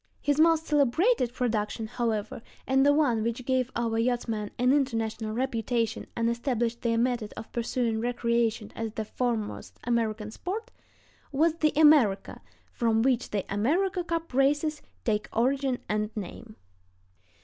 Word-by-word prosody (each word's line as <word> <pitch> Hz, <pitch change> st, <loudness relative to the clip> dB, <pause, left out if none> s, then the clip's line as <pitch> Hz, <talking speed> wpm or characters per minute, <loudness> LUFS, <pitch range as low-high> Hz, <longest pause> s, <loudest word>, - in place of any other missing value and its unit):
His 290 Hz, 0 st, 0 dB
most 325 Hz, 0 st, +4 dB
celebrated 295 Hz, -, +2 dB
production, 225 Hz, -3 st, -1 dB
however, 220 Hz, -2 st, -2 dB, 0.2 s
and 265 Hz, 0 st, +3 dB
the 285 Hz, -, +6 dB
one 285 Hz, -7 st, +2 dB
which 235 Hz, +3 st, -2 dB
gave 255 Hz, -1 st, +1 dB
our 230 Hz, -1 st, 0 dB
yachtsmen 230 Hz, -3 st, -1 dB
an 250 Hz, +2 st, +3 dB
international 225 Hz, -5 st, -1 dB
reputation 235 Hz, -2 st, -1 dB
and 230 Hz, 0 st, 0 dB
established 235 Hz, -1 st, -1 dB
their 230 Hz, -1 st, +1 dB
method 235 Hz, -3 st, -1 dB
of 225 Hz, -, -8 dB
pursuing 235 Hz, -1 st, -1 dB
recreation 235 Hz, -2 st, 0 dB
as 225 Hz, -1 st, -4 dB
the 220 Hz, -, -3 dB
foremost 230 Hz, -2 st, -3 dB
American 220 Hz, -3 st, -1 dB
sport, 390 Hz, -, -5 dB, 0.6 s
was 310 Hz, +3 st, +3 dB
the 305 Hz, -2 st, +3 dB
America, 290 Hz, -, +4 dB, 0.3 s
from 225 Hz, -1 st, +1 dB
which 255 Hz, -2 st, +1 dB
the 200 Hz, -2 st, -2 dB
"America 350 Hz, -, +1 dB
Cup" 330 Hz, -3 st, -3 dB
races 295 Hz, +3 st, +2 dB, 0.2 s
take 210 Hz, -2 st, 0 dB
origin 265 Hz, +2 st, +1 dB
and 210 Hz, 0 st, -1 dB
name. 215 Hz, +2 st, -7 dB
235 Hz, 140 wpm, -28 LUFS, 225-275 Hz, 0.6 s, the